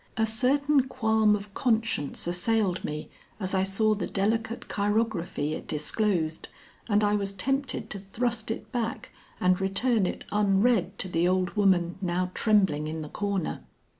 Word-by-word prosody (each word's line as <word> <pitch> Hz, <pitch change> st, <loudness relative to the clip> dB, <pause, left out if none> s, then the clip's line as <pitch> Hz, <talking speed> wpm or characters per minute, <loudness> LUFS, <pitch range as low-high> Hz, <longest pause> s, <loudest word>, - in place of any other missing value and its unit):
A 220 Hz, -, +3 dB
certain 265 Hz, +5 st, +2 dB
qualm 220 Hz, -4 st, +3 dB
of 200 Hz, -1 st, -7 dB
conscience 225 Hz, -, 0 dB
assailed 185 Hz, +2 st, 0 dB
me 150 Hz, 0 st, -4 dB, 0.3 s
as 190 Hz, -2 st, -3 dB
I 190 Hz, -, +3 dB
saw 195 Hz, +3 st, +2 dB
the 200 Hz, -4 st, -3 dB
delicate 220 Hz, +3 st, -1 dB
chirography 205 Hz, -7 st, -1 dB
it -, -, -6 dB
disclosed 160 Hz, +1 st, -1 dB, 0.4 s
and 210 Hz, 0 st, +3 dB
I 205 Hz, 0 st, +3 dB
was 200 Hz, -1 st, -1 dB
tempted 270 Hz, +7 st, -2 dB
to 205 Hz, -, -5 dB
thrust 220 Hz, +3 st, -2 dB
it 225 Hz, -, -5 dB
back 235 Hz, -3 st, -3 dB, 0.3 s
and 180 Hz, +1 st, +2 dB
return 195 Hz, +2 st, +2 dB
it -, -, -5 dB
unread 200 Hz, -1 st, +2 dB
to -, -, 0 dB
the 175 Hz, -1 st, +1 dB
old 185 Hz, 0 st, +1 dB
woman 190 Hz, -4 st, +2 dB
now 180 Hz, 0 st, -1 dB
trembling 190 Hz, -9 st, +2 dB
in 160 Hz, 0 st, -4 dB
the 150 Hz, -, -8 dB
corner. 200 Hz, -2 st, -2 dB
205 Hz, 155 wpm, -27 LUFS, 180-225 Hz, 0.4 s, A